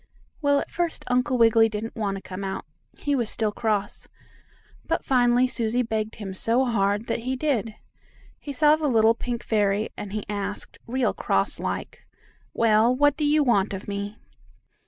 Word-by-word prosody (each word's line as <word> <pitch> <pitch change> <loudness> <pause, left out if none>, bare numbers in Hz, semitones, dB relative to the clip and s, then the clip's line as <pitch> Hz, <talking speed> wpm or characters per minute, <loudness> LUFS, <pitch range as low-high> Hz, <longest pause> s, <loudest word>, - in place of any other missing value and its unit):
Well, 285 -1 +3
at - - -6
first 345 -1 -2
Uncle 250 +1 +1
Wiggily 225 -1 +5
didn't 215 +1 -5
want 205 -4 -2
to 195 - -8
come 185 +1 -7
out. 190 0 -4 0.3
He 290 - -1
was 235 -5 0
still 215 -2 0
cross, 210 -2 -2 0.8
but - - -2
finally 245 -1 +4
Susie 240 -1 0
begged 220 -1 -3
him 200 -4 -6
so 230 +7 +1
hard 205 -2 +1
that - - -2
he 255 +3 -2
did. 250 -6 -1 0.6
He 290 - -7
saw 300 +3 +5
the 310 -1 -1
little 225 -3 +4
pink 235 0 -4
fairy, 210 -1 +1
and 205 - -7
he 210 0 -3
asked, 205 0 -5
real 255 +1 0
cross - - -1
like: - - -5 0.4
"Well, 230 +2 +3
what 290 +1 +3
do 305 - -3
you 295 +1 +4
want 200 -6 +2
of 195 - -8
me?" 200 +1 -4
225 Hz, 175 wpm, -25 LUFS, 210-255 Hz, 0.8 s, Wiggily